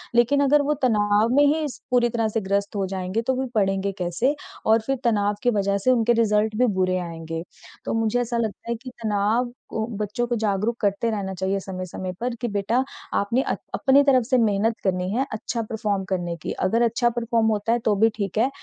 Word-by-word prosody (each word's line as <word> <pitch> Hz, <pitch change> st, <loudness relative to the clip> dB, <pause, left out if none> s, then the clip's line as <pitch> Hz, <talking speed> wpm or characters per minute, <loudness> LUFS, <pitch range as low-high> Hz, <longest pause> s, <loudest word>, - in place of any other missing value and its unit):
लेकिन 240 Hz, +4 st, +4 dB
अगर 285 Hz, +1 st, +4 dB
वो 295 Hz, +1 st, +1 dB
तनाव 210 Hz, -2 st, +3 dB
में 290 Hz, -, +6 dB
ही 310 Hz, +2 st, +2 dB
इस 290 Hz, -4 st, -5 dB
पूरी 240 Hz, -1 st, +3 dB
तरह 230 Hz, -1 st, 0 dB
से 225 Hz, +1 st, -1 dB
ग्रस्त 200 Hz, +1 st, -1 dB
हो 195 Hz, -1 st, 0 dB
जाएँगे 185 Hz, +3 st, -2 dB
तो 260 Hz, +3 st, 0 dB
फिर 265 Hz, -, -2 dB
पढ़ेंगे 195 Hz, -1 st, +1 dB
कैसे 185 Hz, -, 0 dB, 0.3 s
और 220 Hz, +1 st, +4 dB
फिर 270 Hz, 0 st, +1 dB
तनाव 205 Hz, -3 st, +2 dB
की 245 Hz, -, +4 dB
वजह 200 Hz, 0 st, +1 dB
से 230 Hz, +6 st, +2 dB
उनके 240 Hz, -1 st, +3 dB
रिज़ल्ट 215 Hz, 0 st, +1 dB
भी 250 Hz, -, +4 dB
बुरे 185 Hz, 0 st, +2 dB
आएँगे। 165 Hz, -1 st, -5 dB, 0.4 s
तो -, -, -2 dB
मुझे 225 Hz, +1 st, +1 dB
ऐसा 235 Hz, 0 st, -2 dB
लगता 225 Hz, 0 st, -3 dB
है -, -, 0 dB
कि 255 Hz, -, -6 dB
तनाव 215 Hz, +3 st, +1 dB, 0.2 s
को 220 Hz, 0 st, -2 dB
बच्चों 215 Hz, +3 st, -2 dB
को 240 Hz, -, 0 dB
जागरूक 215 Hz, +2 st, 0 dB
करते 205 Hz, +3 st, +1 dB
रहना 195 Hz, -3 st, -3 dB
चाहिए 190 Hz, +2 st, -1 dB
समय-समय 185 Hz, -1 st, -5 dB
पर 240 Hz, 0 st, -2 dB
कि, 240 Hz, -, 0 dB
बेटा 210 Hz, +5 st, 0 dB, 0.3 s
आपने 230 Hz, +6 st, +1 dB
अ, -, -, -1 dB, 0.2 s
अपनी 280 Hz, 0 st, +4 dB
तरफ 260 Hz, -4 st, +4 dB
से 255 Hz, +1 st, +2 dB
मेहनत 220 Hz, 0 st, +2 dB
करनी 185 Hz, -1 st, 0 dB
है 260 Hz, +4 st, +1 dB
अच्छा 230 Hz, +2 st, -3 dB
परफॉर्म 210 Hz, -3 st, -1 dB
करने 175 Hz, -2 st, -2 dB
की। -, -, -4 dB
अगर 225 Hz, +5 st, +2 dB
अच्छा 240 Hz, +1 st, +2 dB
परफॉर्म 235 Hz, -1 st, 0 dB
होता 215 Hz, +1 st, 0 dB
है 240 Hz, -, +1 dB
तो 210 Hz, -, +3 dB
भी 225 Hz, +3 st, +4 dB
ठीक 200 Hz, -1 st, -3 dB
है, 245 Hz, +5 st, +3 dB
220 Hz, 215 wpm, -24 LUFS, 200-240 Hz, 0.4 s, में